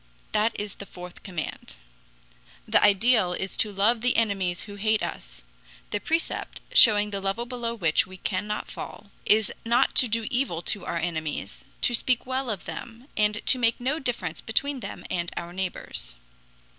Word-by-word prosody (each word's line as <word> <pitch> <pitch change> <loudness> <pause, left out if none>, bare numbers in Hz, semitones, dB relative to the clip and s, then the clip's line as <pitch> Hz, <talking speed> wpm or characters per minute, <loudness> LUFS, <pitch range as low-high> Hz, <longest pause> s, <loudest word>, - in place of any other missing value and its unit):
That 215 +2 +1
is 205 -1 -4
the 200 - -10
fourth 180 0 -10
command. 160 - -6 0.9
The - - +4
ideal 205 -2 +4
is 190 +2 -4
to 215 - +2
love 215 +4 +2
the 245 +1 +2
enemies 195 -6 +1
who 205 - -9
hate 215 +1 +1
us. - - -6 0.5
The 205 - 0
precept, 325 +9 -1
showing 210 - +7
the 200 -1 -3
level 195 +5 -1
below 240 -2 -3
which 165 -7 +2
we 185 0 -11
cannot 205 +3 -2
fall, 205 -1 -8 0.2
is 215 -1 +4
not 240 +3 +3
to 250 - +6
do 225 0 0
evil 245 -11 0
to 200 -4 +1
our - - -1
enemies, 155 - -3 0.2
to 245 - +3
speak 245 +1 +2
well 260 0 -1
of 205 -4 -3
them, 235 +4 -8
and 210 0 +1
to 255 - +3
make 230 -1 +2
no 270 +6 0
difference 235 - -2
between 275 +5 0
them - - -7
and 170 -1 -1
our 170 0 -5
neighbors. 185 - -4
210 Hz, 170 wpm, -26 LUFS, 185-235 Hz, 0.9 s, showing